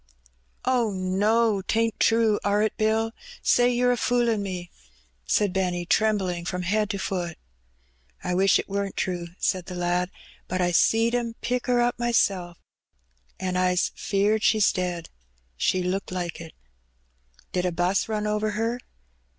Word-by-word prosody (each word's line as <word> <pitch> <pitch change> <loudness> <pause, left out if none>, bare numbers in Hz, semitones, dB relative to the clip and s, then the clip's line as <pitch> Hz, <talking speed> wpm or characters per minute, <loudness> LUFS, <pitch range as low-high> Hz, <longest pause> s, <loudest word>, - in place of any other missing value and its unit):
'^ - - -39 0.6
Oh, 245 -3 +2
no! 200 +3 +1
't 220 +4 0
ain't 230 -2 0
true, 225 -2 +3
are 205 +1 +2
it. 215 - 0
Bill? 220 +1 +1 0.3
Say 245 0 +4
yer 245 0 +2
a - - +2
foolin' 235 -3 +1
me," 180 -3 -5 0.6
said 200 - +2
Benny, 180 -2 -1
trembling 190 -4 +1
from 180 +1 -3
head 210 +3 +1
to 200 - -2
foot. 175 -3 -3 0.4
" - - -33
I 180 - -1
wish 195 +2 +4
it - - -4
weren't 200 0 -3
true," 175 -2 -2
said 185 -2 -1
the 180 - -6
lad; 175 0 0 0.2
" - - -26
but 185 - -2
I 175 -1 +2
seed 225 +6 +3
'em 235 -2 -1
pick 250 +1 -2
her 245 -1 +3
up 240 0 0
mysel', 195 -7 +1 0.8
an' 185 -1 -2
I's 180 -1 +2
'feared 205 +2 +1
she's 215 -2 +4
dead; 180 -2 -3 0.5
she 185 - +1
looked 185 +2 -2
like 175 -2 -4
it." 165 -1 -10 1.0
'^Did 180 0 0
a 180 - +1
'bus 180 +4 0
run 215 -1 -1
over 210 0 0
her?" 230 +2 -1
195 Hz, 165 wpm, -25 LUFS, 180-225 Hz, 1.0 s, Say